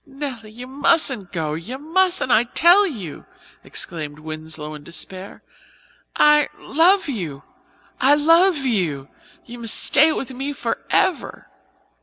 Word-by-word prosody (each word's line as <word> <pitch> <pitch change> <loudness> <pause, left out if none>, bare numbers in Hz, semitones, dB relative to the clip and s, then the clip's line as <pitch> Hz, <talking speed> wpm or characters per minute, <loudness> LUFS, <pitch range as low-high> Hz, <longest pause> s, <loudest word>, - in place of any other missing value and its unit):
"Nelly, 270 -6 -7
you 240 +4 -10
mustn't 265 - +1
go 155 -4 -3
you 170 +12 -6
mustn't, 345 0 +1
I 235 0 +4
tell 350 +10 +4
you," 200 - -8 0.4
exclaimed 150 -3 -6
Winslow 155 0 -7
in 150 -1 -10
despair. 185 +4 -6 0.7
"I 300 0 +4
love 360 +6 +2
you 170 - -5 0.6
I 280 +3 +4
love 330 0 +3
you 165 - -1 0.4
you 240 0 -10
must 230 -2 +1
stay 310 +3 +5
with 270 -3 -5
me 270 +3 -4
forever." 370 +5 -2
250 Hz, 125 wpm, -21 LUFS, -, 0.7 s, stay